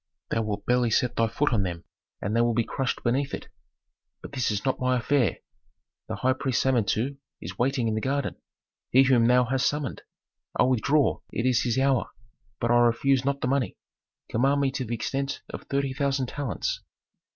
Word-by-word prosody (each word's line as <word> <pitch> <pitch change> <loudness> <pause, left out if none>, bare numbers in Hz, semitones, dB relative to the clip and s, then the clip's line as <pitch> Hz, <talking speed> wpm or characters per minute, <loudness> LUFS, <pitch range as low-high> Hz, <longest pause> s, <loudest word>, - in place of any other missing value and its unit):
Thou 115 - +1
wilt 105 -2 -3
barely 125 -1 +2
set 120 +2 +1
thy 115 - +2
foot 145 +4 0
on 110 - +3
them 85 -3 -3 0.4
and 105 +3 -1
they 115 - +4
will 120 -1 +2
be 120 - +3
crushed 135 +3 -2
beneath 135 +4 0
it. - - -11 0.7
But - - -8
this 130 -4 0
is 105 +2 -2
not 130 - 0
my 130 -1 +2
affair. 125 -1 +1 0.7
The - - -3
high 130 +1 +2
priest 130 -1 0
Samentu 130 +1 +1 0.2
is - - -8
waiting 125 -1 +1
in 110 - 0
the 110 - -1
garden, 140 +2 -1 0.5
he 130 +2 +6
whom 125 -3 +4
thou 125 +1 +5
hast 130 +2 +1
summoned. 145 -4 -4 0.6
I - - +7
withdraw; 130 +2 +2
it 115 - -2
is 125 -2 +3
his 120 0 0
hour. 135 -2 +2 0.5
But 120 - 0
I 120 - +5
refuse 120 +3 +3
not 140 +1 -1
the - - 0
money. 135 -1 0 0.5
Command 135 +5 +2
me 135 -1 +1
to 130 -1 -3
the 120 +1 -2
extent 135 +4 -3
of - - -8
thirty 140 -1 -1
thousand 135 -2 0
talents." 135 - -3
125 Hz, 195 wpm, -26 LUFS, 115-135 Hz, 0.7 s, I